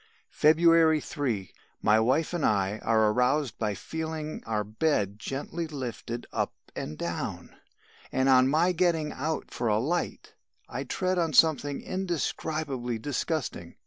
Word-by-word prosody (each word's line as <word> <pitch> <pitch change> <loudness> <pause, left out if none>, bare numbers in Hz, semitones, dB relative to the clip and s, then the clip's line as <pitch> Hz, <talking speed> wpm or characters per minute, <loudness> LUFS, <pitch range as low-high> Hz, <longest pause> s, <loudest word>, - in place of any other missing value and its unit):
"February 160 0 +5
3. 120 -11 -3 0.3
My 110 +1 +5
wife 130 +10 +1
and 170 -4 -1
I 100 0 +1
are 110 -1 +3
aroused 125 +1 +1
by 105 -2 -1
feeling 160 +3 -5
our 110 -2 0
bed 105 -2 0
gently 145 +8 -4
lifted 120 -4 -5
up - - -1 0.2
and 75 - -5
down, 85 0 -4 0.6
and 130 0 +1
on 130 -1 +6
my 160 +6 +3
getting 165 -3 +1
out 155 +4 -3
for 120 - -2
a 105 -1 +3
light, 155 +10 -2 0.3
I - - -5
tread 185 -1 0
on 165 -2 0
something 145 -1 +3
indescribably 155 -8 -2
disgusting. 130 - -3
140 Hz, 135 wpm, -28 LUFS, 110-160 Hz, 0.6 s, on